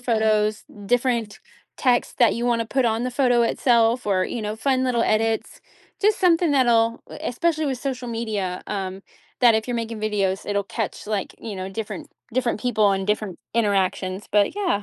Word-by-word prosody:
photos, 215 -3 +1 0.2
different 240 -2 0 0.4
text 245 -2 +1
that 235 -5 +5
you 240 +1 -2
want 235 -1 +2
to 225 - -2
put 265 +1 0
on 225 +1 +1
the 250 - -1
photo 245 -2 +3
itself, 235 0 +2
or, 185 -2 +2
you 235 - -4
know, 210 0 -3
fun 260 +2 +1
little 240 -2 +1
edits, 220 +1 0 0.4
just 420 +1 +3
something 340 -3 +4
that'll, 235 -3 +3
e - - -8
especially 315 +4 0
with 260 -3 -2
social 255 -2 -4
media, 215 -6 -3
um, 195 -1 -4 0.4
that 235 -3 +6
if 220 - -2
you're 245 - -2
making 230 -1 -4
videos, 200 -3 -1
it'll 200 0 +1
catch, 210 +1 -5
like, 205 -3 -2
you 215 -4 -6
know, 185 0 -4
different 210 +2 -6 0.2
different 245 -3 0
people 220 -5 +2
and 195 0 -2
different 210 -3 -1 0.2
interactions, 195 -3 0
but 205 - +3
yeah, 360 - 0
225 Hz, 180 wpm, -23 LUFS, 210-245 Hz, 0.4 s, that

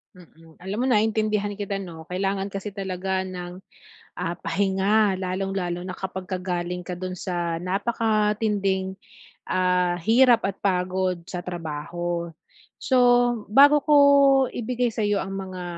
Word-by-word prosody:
Mm, 165 -2 -18
alam 190 +3 -5
mo - - +1
naintindihan 215 -2 +1
kita 200 -1 -3
'no, 165 -4 -8
kailangan 195 +1 -2
kasi 195 0 -6
talaga 190 -1 -2
ng, 180 0 -8 0.5
ah, 175 -1 -4
pahinga, 195 +2 +1
lalong-lalo 185 -1 -3
na 180 0 -6
kapagka 190 0 -5
galing 180 -1 -3
ka 180 - -6
do'n 185 +1 -5
sa 175 -2 -2
napakatinding, 205 0 0 0.5
ah, 180 -1 +1
hirap 235 +4 +5
at 195 - -5
pagod 185 -1 -1
sa 175 -1 -5
trabaho. 170 0 -4 0.5
So, 260 - +1 0.6
bago 285 +3 +6
ko 300 - +3 0.5
ibigay 245 +1 -2
sa'yo 205 -3 0
ang 195 0 -5
mga 185 -2 -6
190 Hz, 125 wpm, -24 LUFS, 180-205 Hz, 0.6 s, bago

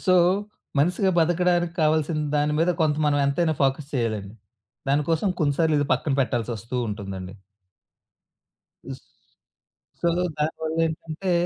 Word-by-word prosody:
So, 185 - +4 0.6
మనిసిగా 180 +6 +2
బతకడానికి 175 0 +2
కావాల్సిన 155 0 +1 0.2
దాని 150 +1 +1
మీద 165 +2 +3
కొంత 150 -2 +2
మనం 145 -1 +2
ఎంతైనా 160 +3 +1
ఫోకస్ 135 +2 0
చేయాలండి. 110 -5 -2 0.6
దానికోసం 155 +6 +1
కొన్నిసార్లు 155 +1 +2
ఇది 145 - 0
పక్కన 145 - 0
పెట్టాల్సొస్తూ 120 -2 -2
ఉంటుందండి. 95 -2 -6 1.5
స్ - - -7 1.0
సో, 170 - +2 0.3
దానివల్లేంటంటే 160 +3 -2
150 Hz, 105 wpm, -24 LUFS, 135-165 Hz, 1.5 s, సో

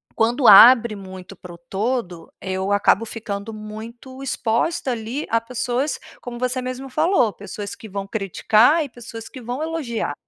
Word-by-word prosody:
quando 240 +3 +2
abre 230 +2 +8
muito 190 -1 -10
para 180 -1 -12
o - - -12
todo, 190 -1 -4
eu 190 +1 -3
acabo 205 +1 +3
ficando 215 -1 -6
muito 225 +5 -10
exposta 265 +4 -1
ali, 240 +5 -4
a 230 0 +2
pessoas 250 +4 -2 0.2
como 245 -1 -7
você 255 +1 -1
mesmo 255 +1 -5
falou, 305 - +2
pessoas 205 0 -7
que 220 - -12
vão 195 0 -5
criticar 220 - +3
e - - -10
pessoas 230 -2 -10
que 260 - -11
vão 245 +5 -4
elogiar. 290 - -3
230 Hz, 160 wpm, -21 LUFS, 205-255 Hz, 0.2 s, abre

